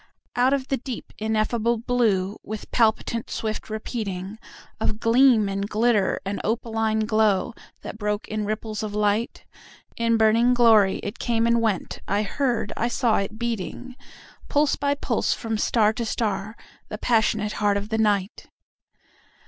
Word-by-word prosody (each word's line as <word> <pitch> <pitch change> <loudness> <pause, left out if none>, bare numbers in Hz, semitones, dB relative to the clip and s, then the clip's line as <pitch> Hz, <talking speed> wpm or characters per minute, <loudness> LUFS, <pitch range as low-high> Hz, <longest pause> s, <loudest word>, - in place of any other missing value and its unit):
Out 250 +2 +3
of 275 -1 -1
the 270 - +1
deep 255 -1 -7
ineffable 220 +2 0
blue, 220 -5 +1
with 215 0 -7
palpitant 230 0 +1
swift 215 -1 -3
repeatingOf 215 0 -5
gleam 235 -2 +4
and 195 +1 -3
glitter 220 -3 +2
and 200 +1 -3
opaline 225 -1 0
glow, 215 +1 +2 0.3
that 215 - -8
broke 210 0 -2
in 215 0 -3
ripples 215 0 -3
of 210 -1 -4
light—In 225 +2 -2
burning 230 +3 +4
glory 220 -5 +5
it 205 - -5
came 230 -1 +1
and 235 0 +3
went,—I 205 -1 -1
heard, 240 0 -1
I 235 - 0
saw 240 -1 +1
it 200 +2 -3
beating, 235 +2 -4 0.5
Pulse 290 0 +2
by 285 0 0
pulse, - - 0
from 225 -2 -3
star 215 -1 +3
to 235 - -3
star,—the 215 0 -4
passionate 220 -2 +1
heart 205 -1 +3
of 200 +1 -5
the 220 0 -1
Night! 205 -2 0
220 Hz, 140 wpm, -24 LUFS, 210-235 Hz, 0.5 s, glory